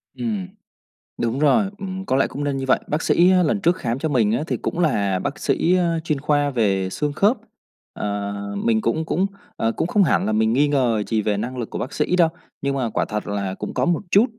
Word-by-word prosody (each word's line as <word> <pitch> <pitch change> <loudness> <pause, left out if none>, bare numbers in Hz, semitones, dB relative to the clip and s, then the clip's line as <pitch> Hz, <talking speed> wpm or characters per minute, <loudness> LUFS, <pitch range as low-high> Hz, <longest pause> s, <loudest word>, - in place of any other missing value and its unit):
Ừm. 210 -6 -3 0.7
Đúng 120 +3 -1
rồi, 195 +7 +3
ừm, 190 -1 -5
có 130 - 0
lẽ 135 - +3
cũng 145 - -5
nên 140 -1 -1
như 135 - -3
vậy. - - +4
Bác 150 +2 -1
sĩ 175 +2 +4
á 180 -1 +4
lần 195 +6 0
trước 175 0 +3
khám 120 -6 -3
cho 160 - -1
mình 115 -6 +2
á 120 +7 0
thì - - -1
cũng 175 - -4
là 100 - +1
bác 145 +6 -4
sĩ, 180 +2 +2
a, 170 -2 +1
chuyên 150 -4 -1
khoa 145 -1 +2
về 100 -7 +1
xương 145 +8 -2
khớp. 210 - +3 0.6
Ờ, 100 0 -3 0.3
mình 110 -1 +2
cũng 160 +7 0
cũng, 180 +4 +1 0.3
ờ, 115 0 0
cũng 165 - -2
không 205 +2 +3
hẳn 160 - +2
là 110 - 0
mình 110 +1 +2
nghi 145 +4 +3
ngờ 125 -7 +1
gì 110 -2 +1
về 105 -1 0
năng 125 +4 -4
lực 120 - -4
của - - -5
bác 130 - -4
sĩ 155 +4 +1
đâu, 170 -3 +4 0.3
nhưng 140 0 -1
mà 130 -4 -1
quả - - -1
thật 105 0 -4
là 100 -2 -2
cũng - - -6
có - - +1
một 175 -1 +1
chút 205 +4 +6
140 Hz, 245 wpm, -22 LUFS, 110-170 Hz, 0.7 s, chút